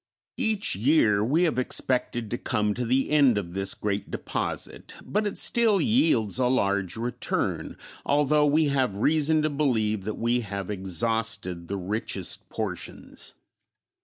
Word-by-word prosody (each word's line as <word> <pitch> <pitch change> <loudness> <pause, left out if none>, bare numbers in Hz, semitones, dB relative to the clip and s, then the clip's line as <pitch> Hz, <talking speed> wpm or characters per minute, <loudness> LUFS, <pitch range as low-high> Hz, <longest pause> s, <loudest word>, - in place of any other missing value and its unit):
Each 220 - +1
year 105 -3 +3
we 150 +10 +2
have 160 -7 +1
expected 125 -3 0
to 120 - -2
come 105 -4 0
to 125 +3 -3
the 130 +4 +1
end 140 -7 +4
of 85 -4 -4
this 95 0 0
great 100 -1 -3
deposit, - - -4
but 210 +1 0
it 205 - -5
still 225 -4 +3
yields 140 - +2
a 125 - +3
large 100 -6 0
return, 120 +1 -3 0.3
although 150 +1 +2
we 155 +2 +3
have 130 -7 0
reason 155 +6 +2
to 155 - +1
believe 110 -8 0
that 110 - -3
we 120 +1 +1
have 100 -3 -5
exhausted 95 -1 -2
the 100 - -3
richest 100 +4 -2
portions. - - -6
120 Hz, 145 wpm, -26 LUFS, 100-150 Hz, 0.3 s, end